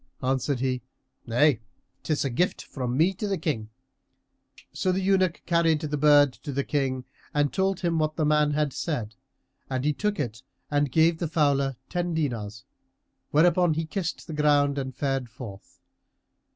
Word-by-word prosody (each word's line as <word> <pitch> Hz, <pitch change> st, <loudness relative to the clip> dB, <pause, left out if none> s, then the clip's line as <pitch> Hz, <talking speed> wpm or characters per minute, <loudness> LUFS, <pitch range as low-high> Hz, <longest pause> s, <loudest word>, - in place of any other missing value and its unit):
Answered 130 Hz, 0 st, 0 dB
he, 130 Hz, -1 st, 0 dB, 0.5 s
"Nay, 125 Hz, +2 st, +3 dB, 0.4 s
'tis 150 Hz, -2 st, -1 dB
a 135 Hz, -, -1 dB
gift 175 Hz, +10 st, 0 dB
from 125 Hz, -2 st, -3 dB
me 170 Hz, +6 st, +4 dB
to 205 Hz, +3 st, -4 dB
the 195 Hz, -1 st, 0 dB
King."[FN#333] 130 Hz, -3 st, -8 dB
So 185 Hz, -, 0 dB
the 185 Hz, -, 0 dB
eunuch 185 Hz, -2 st, +1 dB
carried 165 Hz, -3 st, +2 dB
the 150 Hz, -1 st, -2 dB
bird 145 Hz, -2 st, +5 dB
to 145 Hz, -, -8 dB
the 140 Hz, +1 st, -1 dB
King 130 Hz, -3 st, -1 dB, 0.3 s
and 145 Hz, -1 st, +2 dB
told 190 Hz, -1 st, 0 dB
him 170 Hz, -3 st, +1 dB
what 155 Hz, 0 st, 0 dB
the 155 Hz, -, 0 dB
man 150 Hz, 0 st, +3 dB
had 150 Hz, -2 st, 0 dB
said; 120 Hz, -10 st, -3 dB, 0.6 s
and 130 Hz, 0 st, -2 dB
he 150 Hz, -, +2 dB
took 210 Hz, +3 st, -1 dB
it 115 Hz, -4 st, -3 dB, 0.3 s
and 145 Hz, -2 st, +1 dB
gave 160 Hz, +3 st, +3 dB
the 170 Hz, -, -1 dB
fowler 140 Hz, -4 st, +1 dB
ten 175 Hz, -1 st, -2 dB
dinars, 115 Hz, -9 st, -3 dB, 0.6 s
whereupon 170 Hz, +1 st, +4 dB
he 160 Hz, +1 st, -1 dB
kissed 170 Hz, +1 st, -4 dB
ground 145 Hz, -1 st, +3 dB
and 130 Hz, -2 st, -5 dB
fared 135 Hz, -3 st, -1 dB
forth. 110 Hz, -5 st, -11 dB
145 Hz, 165 wpm, -26 LUFS, 130-165 Hz, 0.6 s, bird